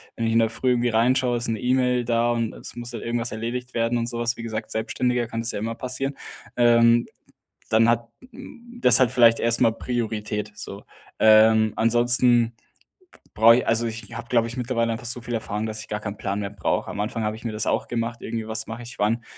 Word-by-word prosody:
Wenn 115 Hz, -, -2 dB
ich 115 Hz, -, 0 dB
in 115 Hz, -, +4 dB
der 115 Hz, -1 st, +2 dB
Früh 125 Hz, +2 st, -1 dB
irgendwie 120 Hz, 0 st, +1 dB
reinschaue, 120 Hz, +2 st, +2 dB
ist 120 Hz, -, -4 dB
'ne 115 Hz, -2 st, -2 dB
E-Mail 125 Hz, -1 st, +1 dB
da 120 Hz, 0 st, +1 dB
und 115 Hz, -2 st, -1 dB
es -, -, -11 dB
muss 120 Hz, 0 st, -6 dB
halt 115 Hz, -, -6 dB
irgendwas 120 Hz, 0 st, -2 dB
erledigt 125 Hz, +3 st, -5 dB
werden 115 Hz, +1 st, 0 dB
und 115 Hz, 0 st, -2 dB
so 120 Hz, -1 st, -5 dB
was, 120 Hz, 0 st, 0 dB
wie 115 Hz, -, -7 dB
gesagt, 110 Hz, -1 st, -4 dB
als -, -, -10 dB
Selbstständiger 120 Hz, +2 st, -1 dB
kann 115 Hz, -, -5 dB
es 115 Hz, -, -3 dB
ja -, -, -4 dB
immer 115 Hz, +2 st, -3 dB
passieren. 130 Hz, +3 st, -4 dB, 0.4 s
Ähm, 120 Hz, -1 st, +4 dB, 0.6 s
dann 115 Hz, +1 st, +4 dB
hat 115 Hz, 0 st, -1 dB, 0.2 s
hm, 240 Hz, +1 st, -13 dB
das -, -, +6 dB
hat 130 Hz, -3 st, +3 dB
vielleicht 115 Hz, -1 st, +5 dB
erst 115 Hz, 0 st, +1 dB
mal 115 Hz, -, +4 dB
Priorität, 110 Hz, -3 st, -3 dB
so. 100 Hz, -1 st, -9 dB, 0.3 s
Ähm, 110 Hz, 0 st, +5 dB
ansonsten 120 Hz, 0 st, +3 dB, 0.6 s
b -, -, -20 dB, 0.2 s
brauche 115 Hz, +1 st, +8 dB
ich 125 Hz, -, -2 dB
also 115 Hz, +1 st, +1 dB
ich 115 Hz, 0 st, -6 dB
habe, 120 Hz, 0 st, -8 dB
glaube 115 Hz, -2 st, +2 dB
ich, 115 Hz, -, -7 dB
mittlerweile 115 Hz, -2 st, -1 dB
einfach 115 Hz, +2 st, -8 dB
so 125 Hz, +1 st, -1 dB
viel 120 Hz, 0 st, -7 dB
Erfahrung, 110 Hz, -1 st, -3 dB
dass 110 Hz, 0 st, -5 dB
ich -, -, -13 dB
gar 105 Hz, -, -3 dB
keinen 105 Hz, -1 st, -6 dB
Plan 100 Hz, +1 st, -3 dB
mehr 100 Hz, -1 st, -4 dB
brauche. 100 Hz, -4 st, -2 dB
Am 100 Hz, -, -4 dB
Anfang 110 Hz, +1 st, -3 dB
habe 105 Hz, 0 st, -2 dB
ich 110 Hz, -, -13 dB
mir 115 Hz, -, -3 dB
das 110 Hz, +1 st, -3 dB
auch -, -, 0 dB
gemacht, 115 Hz, 0 st, -3 dB
irgendwie 115 Hz, -1 st, -5 dB
was 110 Hz, 0 st, -4 dB
mache 110 Hz, +2 st, -7 dB
ich 120 Hz, +1 st, -10 dB
wann. 115 Hz, +3 st, 0 dB
115 Hz, 235 wpm, -23 LUFS, 110-120 Hz, 0.6 s, brauche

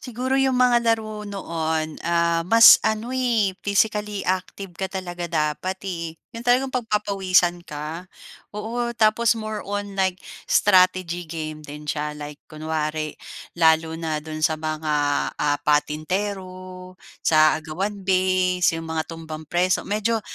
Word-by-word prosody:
Siguro 250 Hz, +1 st, -4 dB
yung 265 Hz, -1 st, +2 dB
mga 250 Hz, -1 st, +4 dB
laro 215 Hz, -2 st, -1 dB
noon, 160 Hz, -5 st, -3 dB
ah, 170 Hz, 0 st, +1 dB
mas 230 Hz, 0 st, +9 dB
ano, 220 Hz, +3 st, -1 dB
eh, 235 Hz, -6 st, +1 dB
physically 210 Hz, -1 st, 0 dB
active 185 Hz, 0 st, -3 dB
ka 190 Hz, +3 st, -4 dB
talaga 175 Hz, -2 st, -5 dB
dapat, 160 Hz, +3 st, -1 dB
eh. 170 Hz, -3 st, -5 dB, 0.2 s
Yung 230 Hz, -, -7 dB
talagang 255 Hz, +2 st, +2 dB
pagpapawisan 195 Hz, -6 st, +1 dB
ka, 155 Hz, +5 st, -6 dB, 0.5 s
oo. 235 Hz, +3 st, -2 dB
Tapos, 225 Hz, +1 st, +3 dB
more 215 Hz, -1 st, -4 dB
on 205 Hz, 0 st, -4 dB
like 190 Hz, -1 st, +1 dB, 0.3 s
strategy 185 Hz, -3 st, +3 dB
game 155 Hz, -1 st, -5 dB
din 150 Hz, 0 st, -10 dB
siya. 150 Hz, 0 st, -3 dB
Like 150 Hz, 0 st, -8 dB
kunwari 155 Hz, 0 st, -3 dB, 0.5 s
lalo 160 Hz, 0 st, +4 dB
na 160 Hz, -2 st, -3 dB
do'n 155 Hz, 0 st, -6 dB
sa 155 Hz, 0 st, +2 dB
mga, 155 Hz, 0 st, -3 dB, 0.4 s
ah, 145 Hz, -1 st, +1 dB
patintero, 185 Hz, +5 st, -2 dB, 0.2 s
sa 155 Hz, 0 st, +4 dB
agawan 190 Hz, +7 st, -4 dB
base, 185 Hz, -2 st, +2 dB
yung 165 Hz, -, -8 dB
mga 160 Hz, -1 st, -1 dB
tumbang 160 Hz, -1 st, -8 dB
preso. 175 Hz, +3 st, +1 dB
Medyo, 215 Hz, +2 st, 0 dB
185 Hz, 135 wpm, -23 LUFS, 160-210 Hz, 0.5 s, mas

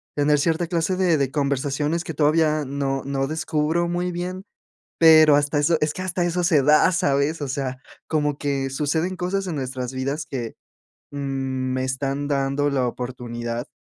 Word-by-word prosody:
tener 145 Hz, 0 st, +3 dB
cierta 165 Hz, +3 st, 0 dB
clase 170 Hz, +2 st, 0 dB
de 180 Hz, -3 st, +2 dB
de 135 Hz, -2 st, 0 dB
conversaciones 145 Hz, +3 st, -1 dB
que 165 Hz, -, -5 dB
todavía 155 Hz, +1 st, +2 dB
no 135 Hz, 0 st, -2 dB
no 135 Hz, -1 st, -1 dB
descubro 160 Hz, +2 st, -1 dB
muy 175 Hz, +1 st, -1 dB
bien, 180 Hz, +2 st, -4 dB, 0.6 s
pero 155 Hz, -2 st, +7 dB
hasta 145 Hz, +1 st, +1 dB
eso, 160 Hz, +3 st, +3 dB
es 150 Hz, 0 st, +1 dB
que -, -, -7 dB
hasta 180 Hz, -1 st, -1 dB
eso 175 Hz, +1 st, 0 dB
se 165 Hz, -5 st, +3 dB
da, 150 Hz, +5 st, +5 dB
¿sabes? 155 Hz, -3 st, 0 dB
O 140 Hz, -, -3 dB
sea, 130 Hz, -1 st, -3 dB, 0.3 s
como 150 Hz, -2 st, 0 dB
que 135 Hz, -2 st, -1 dB
suceden 160 Hz, +6 st, -1 dB
cosas 190 Hz, +2 st, -2 dB
en 170 Hz, -5 st, -3 dB
nuestras 130 Hz, -1 st, -4 dB
vidas 135 Hz, +3 st, -3 dB
que, 120 Hz, -4 st, -5 dB, 0.6 s
mm, 145 Hz, -, -7 dB, 0.6 s
me 130 Hz, 0 st, -1 dB
están 135 Hz, +2 st, -2 dB
dando 140 Hz, +1 st, +1 dB
la 130 Hz, -3 st, 0 dB
oportunidad 120 Hz, 0 st, -5 dB
145 Hz, 170 wpm, -23 LUFS, 135-165 Hz, 0.6 s, pero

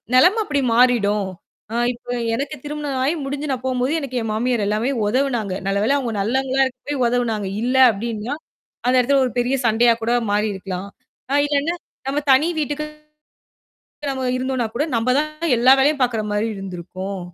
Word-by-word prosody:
நிலைமை 360 Hz, -, +6 dB
அப்படி 285 Hz, -5 st, 0 dB
மாறிடும். 210 Hz, -5 st, +3 dB, 0.6 s
இப்போ 245 Hz, 0 st, -9 dB, 0.2 s
எனக்குத் 285 Hz, +5 st, -5 dB
திருமணம் 295 Hz, -2 st, -3 dB
ஆகி 280 Hz, +5 st, +2 dB
முடிஞ்சு 285 Hz, +2 st, -4 dB
நான் 255 Hz, -1 st, -3 dB
போகும்போது 255 Hz, +1 st, 0 dB
எனக்கு 275 Hz, -4 st, -6 dB
என் 225 Hz, -1 st, -3 dB
மாமியார் 235 Hz, 0 st, 0 dB
எல்லாமே 215 Hz, +5 st, 0 dB, 0.2 s
உதவுனாங்க. 240 Hz, -4 st, 0 dB
நல்லவேளை, 200 Hz, +6 st, +2 dB
அவங்க 245 Hz, -5 st, -2 dB
நல்லவங்களா 265 Hz, +5 st, +1 dB
இருக்கப்போயி, 260 Hz, +2 st, -6 dB
உதவுனாங்க. 230 Hz, -4 st, 0 dB, 0.2 s
இல்ல 250 Hz, +2 st, 0 dB, 0.2 s
அப்படின்னா, 225 Hz, +4 st, -4 dB, 0.5 s
அந்த 250 Hz, -, +3 dB
இடத்துல 270 Hz, +2 st, +3 dB
ஒரு 250 Hz, -, -4 dB
பெரிய 245 Hz, +2 st, +1 dB
சண்டையா 230 Hz, +1 st, +4 dB
கூட 230 Hz, +2 st, +1 dB, 0.2 s
மாறி 210 Hz, +1 st, +2 dB
இருக்கலாம். 190 Hz, 0 st, -5 dB, 0.4 s
அ -, -, +2 dB
இல்லைனா 290 Hz, +3 st, 0 dB, 0.3 s
நாம 275 Hz, +2 st, 0 dB
தனி 265 Hz, +4 st, +5 dB
வீட்டுக்குத் 300 Hz, +1 st, -3 dB, 1.1 s
தான் 285 Hz, -, -1 dB
நம்ம 265 Hz, -1 st, -3 dB
இருந்தோம்னா 255 Hz, -2 st, -1 dB
கூட 290 Hz, -, +1 dB
நம்ம 230 Hz, +2 st, +1 dB
தான் 305 Hz, +2 st, -2 dB
எல்லா 250 Hz, +3 st, +6 dB
வேலையும் 285 Hz, +2 st, +3 dB
பாக்குற 235 Hz, -3 st, +1 dB
மாதிரி 205 Hz, +2 st, 0 dB
இருந்திருக்கும். 185 Hz, +1 st, -6 dB
250 Hz, 160 wpm, -21 LUFS, 220-280 Hz, 1.1 s, நிலைமை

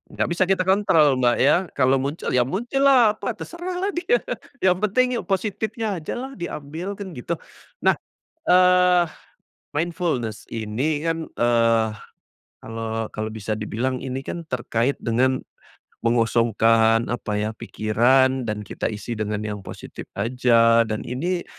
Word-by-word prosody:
nggak -, -, 0 dB
bisa 170 Hz, +2 st, +2 dB
kita 190 Hz, -1 st, +3 dB
kontrol 165 Hz, -8 st, +3 dB
Mbak 120 Hz, -1 st, +3 dB
ya, 140 Hz, -, +6 dB, 0.2 s
kalau 135 Hz, 0 st, +3 dB
muncul 140 Hz, +5 st, -3 dB
ya 125 Hz, -, +4 dB
muncul 240 Hz, -, -2 dB
lah 250 Hz, -6 st, +6 dB
apa 240 Hz, -, -3 dB
terserahlah 360 Hz, -, -4 dB
dia, 395 Hz, +8 st, +2 dB, 0.5 s
yang 185 Hz, -1 st, +4 dB
penting 215 Hz, +5 st, +3 dB
ya -, -, -3 dB
positifnya 220 Hz, +3 st, -1 dB
aja 155 Hz, -, -4 dB
lah 260 Hz, +2 st, -5 dB
diambil, 170 Hz, +3 st, -5 dB
kan 200 Hz, -2 st, -7 dB
gitu. 155 Hz, +5 st, -3 dB, 0.5 s
Nah, -, -, +6 dB, 0.5 s
eee, 180 Hz, -1 st, +5 dB, 0.7 s
mindfulness 155 Hz, -, -2 dB
ini 120 Hz, +8 st, -1 dB
kan, 165 Hz, -1 st, -1 dB
eee, 115 Hz, -1 st, +3 dB, 0.7 s
kalau 115 Hz, 0 st, -4 dB
kalau 110 Hz, 0 st, -3 dB
bisa 110 Hz, 0 st, -3 dB
dibilang 120 Hz, +5 st, -2 dB
ini 130 Hz, 0 st, -3 dB
kan 170 Hz, +4 st, -6 dB
terkait 125 Hz, 0 st, -1 dB
dengan 130 Hz, +3 st, +1 dB, 0.6 s
mengosongkan 115 Hz, -1 st, +3 dB
apa 105 Hz, -3 st, -3 dB
ya, 105 Hz, +1 st, -1 dB
pikiran 120 Hz, +4 st, +2 dB
dan 105 Hz, -1 st, -4 dB
kita -, -, -3 dB
isi 110 Hz, +2 st, -5 dB
dengan 105 Hz, -1 st, -2 dB
yang 105 Hz, -1 st, -4 dB
positif -, -, -10 dB
aja, 115 Hz, +1 st, +4 dB
dan 110 Hz, -2 st, -3 dB
ini 175 Hz, +9 st, -2 dB
130 Hz, 140 wpm, -23 LUFS, 115-180 Hz, 0.7 s, ya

